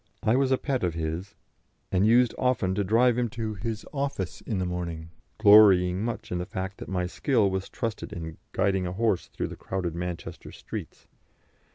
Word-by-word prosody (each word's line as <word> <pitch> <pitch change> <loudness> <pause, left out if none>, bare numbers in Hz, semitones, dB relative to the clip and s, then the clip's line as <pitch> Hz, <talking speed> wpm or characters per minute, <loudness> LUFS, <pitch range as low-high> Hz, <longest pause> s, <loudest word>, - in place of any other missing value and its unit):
I 110 - +3
was 135 0 +2
a 130 - +4
pet 135 -5 -2
of 85 -2 0
his, 80 +4 -4 0.6
and 95 +3 +3
used 120 +1 +5
often 125 -8 +1
to 100 +1 0
drive 120 +4 +3
him 120 -1 0
to 110 -2 -2
his 110 +2 -4
office 140 - -3
in 110 - -3
the 90 - 0
morning, 85 -2 -4 0.3
glorying 100 -3 +6
much 115 0 -4
in 90 - -1
the 90 - -3
fact 95 -2 -5
that - - -8
my 90 -1 -1
skill 105 +2 +1
was 95 0 -3
trusted 115 -3 -4
in 80 -1 -6
guiding 95 -2 +1
a 90 - -4
horse 100 -3 0
through - - -4
the - - -7
crowded 90 -3 -3
Manchester 85 0 -6
streets. - - -8
95 Hz, 190 wpm, -27 LUFS, 90-115 Hz, 0.6 s, glorying